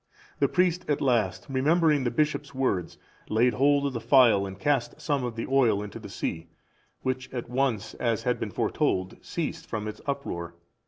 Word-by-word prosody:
The - - +4
priest 180 -1 +1
at 145 - +1
last, 115 -8 +1
remembering 150 +1 +2
the - - +2
bishop's 145 +1 -1
words, 100 -10 -1 0.3
laid 120 +3 +3
hold 140 +4 +3
of 140 - -1
the 115 - -3
phial 115 -8 +5
and 95 0 -8
cast 140 0 0
some 140 -4 -1
of 120 -2 -3
the 115 - -3
oil 120 -7 +3
into 105 - -8
the - - -9
sea, 80 0 -4 0.6
which 130 0 -2
at 120 -2 -4
once, 125 -5 0
as 115 -3 -1
had 125 0 0
been - - -3
foretold, 95 0 -1
ceased - - -4
from 105 -1 -3
its 105 - -7
uproar. 85 -12 -4
125 Hz, 180 wpm, -27 LUFS, 110-140 Hz, 0.6 s, phial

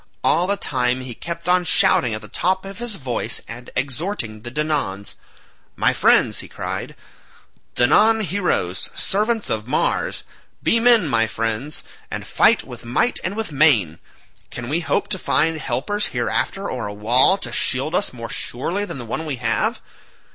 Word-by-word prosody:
All 175 +2 +3
the 200 +1 0
time 125 -4 0
he 130 -1 -7
kept 170 +6 -6
on 180 0 +4
shouting 120 -8 +4
at 110 - -7
the 105 - -10
top 185 - 0
of 195 +2 -8
his 240 -3 -2
voice 125 - -1
and 120 +2 -9
exhorting 130 - -3
the 120 - -7
Danaans. 140 -9 -2 0.6
"My - - +2
friends," - - +4
he - - -7
cried, - - -5 0.8
"Danaan 215 - +4
heroes, 180 - -1
servants 215 +2 0
of 110 0 -2
Mars, 140 - 0 0.4
be 230 - +3
men 230 -6 +5
my 115 -4 +2
friends, 115 +7 -3 0.3
and - - -5
fight - - +3
with - - -10
might 120 - +1
and 185 +3 -2
with 220 -6 -3
main. 125 - +3 0.5
Can 120 0 -6
we 155 +4 +1
hope 145 -4 0
to - - 0
find 160 0 +1
helpers 205 +6 -1
hereafter, 195 +1 -2
or 120 -5 -4
a 105 - -6
wall 125 - +4
to - - -6
shield 135 +5 0
us 200 - +1
more 115 -2 -7
surely 175 - -3
than 200 - -7
the 120 - -7
one 120 +8 -3
we 145 - -2
have? 115 -2 -1
145 Hz, 170 wpm, -21 LUFS, 120-190 Hz, 0.8 s, men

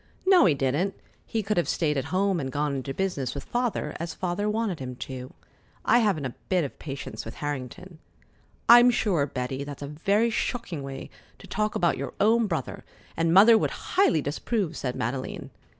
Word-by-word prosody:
"No, 375 - +6
he 160 -6 +4
didn't. 140 +9 0 0.3
He 220 -1 -1
could 205 0 -1
have 175 - +1
stayed 150 -3 +1
at 135 - -1
home 190 -1 +1
and 135 -3 -3
gone 145 +1 -1
into 135 +1 -4
business 145 -7 -2
with 140 - -5
Father, 240 -11 -2
as 165 -1 -4
Father 185 +3 -1
wanted 215 -5 -1
him 125 -1 -6
to. 130 0 -7 0.5
I 240 - +5
haven't 195 - +1
a 130 - -4 0.2
bit 185 -3 +2
of 140 - -6
patience 135 -7 -6
with 110 - -8
Harrington." 145 +5 -6 0.7
"I'm 240 +1 +9
sure, 190 -11 +1
Betty, 130 +1 -4
that's 145 0 -7
a - - -5
very 200 +10 +1
shocking 225 - -2
way 135 0 -7 0.3
to - - -14
talk 215 +1 -1
about 170 -2 +2
your - - -5
own 225 +2 +4
brother, 160 -8 -4 0.3
and 165 0 +1
Mother 220 +5 +8
would - - 0 0.2
highly 365 - +3
disapprove!" 170 - -2
said 125 -2 -3
Madeleine. 130 +3 -4
165 Hz, 185 wpm, -26 LUFS, 140-210 Hz, 0.7 s, I'm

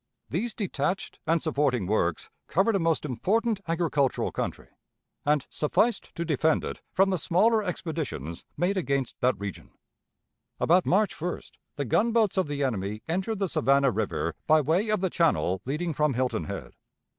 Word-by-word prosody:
These 215 +9 -2
detached 190 - -2
and 165 +1 +2
supporting 140 - +1
works 90 -4 0 0.2
covered 200 +6 +2
a - - +2
most 165 -2 +1
important 210 - 0
agricultural 160 -5 +1
country, - - -4 0.6
and 150 -2 +3
sufficed 220 +10 0
to 170 - -2
defend 160 0 +2
it - - -5
from 195 +1 +3
the 185 - 0
smaller 215 +9 +3
expeditions 160 - -4
made 190 +3 +1
against 140 -7 -1
that 125 +1 +3
region. 100 -2 -6 0.9
"About 180 +2 +3
March 205 +2 +2
1st 175 +2 -5 0.2
the 140 - -2
gunboats 220 - +2
of 190 -4 +1
the 145 -1 -2
enemy 105 -4 -2
entered 190 +6 -1
the 195 0 0
Savannah 140 -2 +3
River 105 -6 -1
by 155 0 +6
way 165 +9 +1
of 215 -3 +1
the 190 -2 0
channel 125 - +1
leading 155 +5 -2
from 150 -2 +1
Hilton 125 -10 0
Head. - - -6
160 Hz, 155 wpm, -27 LUFS, 135-190 Hz, 0.9 s, by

